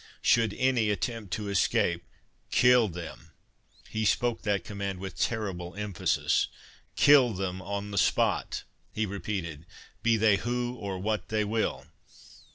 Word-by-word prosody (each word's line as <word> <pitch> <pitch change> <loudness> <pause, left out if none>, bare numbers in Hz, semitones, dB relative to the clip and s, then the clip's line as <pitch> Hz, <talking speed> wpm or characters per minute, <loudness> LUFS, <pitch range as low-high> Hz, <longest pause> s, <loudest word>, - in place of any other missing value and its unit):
Should 115 -3 +3
any 125 -4 +2
attempt 105 0 -3
to 105 -1 -3
escape, 85 -3 +1 0.5
KILL 125 -2 +5
them."—He 90 +4 -9
spoke 115 +3 +1
that 100 -4 0
command 100 -2 -4
with 95 -1 -7
terrible 95 -6 -2
emphasis.—"Kill 115 +5 +2
them 95 0 -3
on 100 +2 -4
the 100 - +1
spot," - - +1 0.3
he 110 - -1
repeated, 90 -5 -5 0.3
"be 115 -1 +3
they 105 -2 +4
who 120 +2 -2
or 100 -6 -5
what 105 +3 -2
they 110 -1 +1
will. 110 +1 -1
105 Hz, 125 wpm, -28 LUFS, 95-115 Hz, 0.5 s, KILL